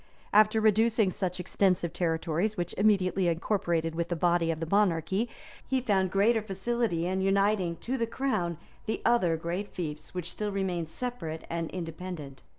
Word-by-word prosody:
And 210 - +8
after 220 +1 -1
reducing 220 -1 +3
such 185 -1 -2
extensive 180 -2 +1
territories, 170 +4 0
which 175 - -2
immediately 195 -3 +3
incorporated 170 -2 0
with 170 +1 -2
the 175 - 0
body 170 0 +2
of 160 -1 -1
the 165 - -2
monarchy, 195 +3 +1 0.4
he 265 -1 +1
found 195 -6 +1
greater 215 +4 +3
facility 200 -3 -1
in 190 +1 0
uniting 195 -2 +2
to 260 +2 -2
the 230 - +1
crown 215 - -1 0.3
the 220 - -2
other 185 -9 +3
great 175 +5 -3
fiefs 155 -3 -6
which 180 -1 -2
still 210 -1 -3
remained 180 -4 -2
separate 165 -7 -5
and 165 -1 -2
independent. 165 -5 -6
185 Hz, 160 wpm, -29 LUFS, 170-210 Hz, 0.4 s, And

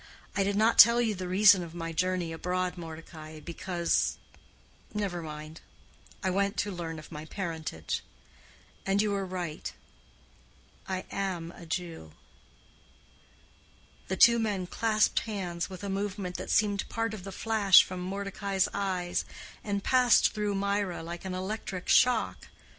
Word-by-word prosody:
I 200 - +2
did 200 +1 0
not 220 +2 +3
tell 235 +2 +9
you 230 -3 +2
the 185 -2 -5
reason 195 +1 +6
of 170 -1 -8
my 165 -1 -4
journey 180 0 0
abroad, 180 +2 -2
Mordecai, 160 -2 -9
because—never 175 +2 -3
mind—I 155 +4 -9
went 200 +2 0
to 205 - 0
learn 165 -3 -5
my 155 -1 -7
parentage. 160 - -4 0.8
And 195 +1 +1
you 210 0 +2
were 195 -1 -1
right. 175 -4 -4 1.2
I 185 -1 -3
am 180 -4 -3
a 170 -1 -12
Jew." 165 - -5 1.9
The 190 - -2
two 235 +3 +7
men 205 -5 -1
clasped 215 +3 +2
hands 185 -6 -4
with 185 +1 -9
a - - -3
movement 195 -2 -3
that - - -6
seemed 205 -1 +1
part 225 -1 -2
of 205 -4 -7
the 195 - -7
flash 205 -2 +5
from 185 0 -6
Mordecai's 195 0 -1
eyes, 185 -3 -1 0.4
and 200 -1 -2
passed 250 -3 +4
through 210 -1 -1
Mirah 200 -3 -1
like 170 +2 -7
an 185 -1 -3
electric 190 0 -4
shock. 250 -3 +3
190 Hz, 135 wpm, -29 LUFS, 175-205 Hz, 1.9 s, tell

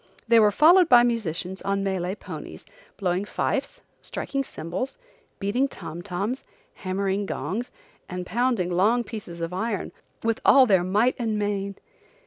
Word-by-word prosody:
They 230 0 +6
were 210 -1 +6
followed 335 - +6
by 240 -1 +8
musicians 190 -6 -2
on 195 0 -1
Malay 190 -1 -1
ponies, - - -9 0.3
blowing 185 -1 0
fifes, 205 - -2 0.2
striking 275 -1 -3
cymbals, 180 - -5 0.4
beating 220 +7 +1
tom 170 - -8
toms, 200 +7 -3 0.3
hammering 195 +1 -2
gongs, 230 +6 -3 0.4
and 180 0 -4
pounding 225 -3 0
long 215 +7 +3
pieces 200 -8 -8
of 165 +1 -3
iron, 210 +1 -2 0.3
with 230 -1 0
all 270 -1 +7
their 190 -6 +4
might 210 +7 +2
and 220 -3 -1
main. 200 -1 -2
205 Hz, 140 wpm, -25 LUFS, 185-235 Hz, 0.4 s, by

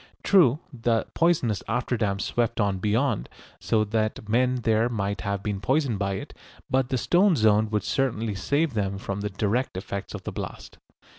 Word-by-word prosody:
True, 155 -10 +5 0.2
the 115 -2 0
poisonous 150 - +2
after 120 +2 -1
damp 100 -3 -1
swept 120 -1 -1
on 100 -3 +1
beyond, 110 +3 0 0.3
so 110 -1 +1
that 110 0 -2
men 125 +3 +2
there 110 +2 +2
might 100 -3 -2
have 100 -1 -3
been 105 -2 -3
poisoned 130 -4 +1
by 100 -1 0
it, 95 - -7 0.4
but 130 -1 +2
the 130 - 0
stone 180 - +3
zone 110 -2 +3
would 105 -1 -1
certainly 115 -5 -1
save 140 - 0
them 100 -2 -1
from 100 0 -4
the 105 - -2
direct 105 +3 -1
effects 100 +1 -5
of - - -8
the - - -4
blast. - - -7
110 Hz, 175 wpm, -26 LUFS, 100-125 Hz, 0.4 s, True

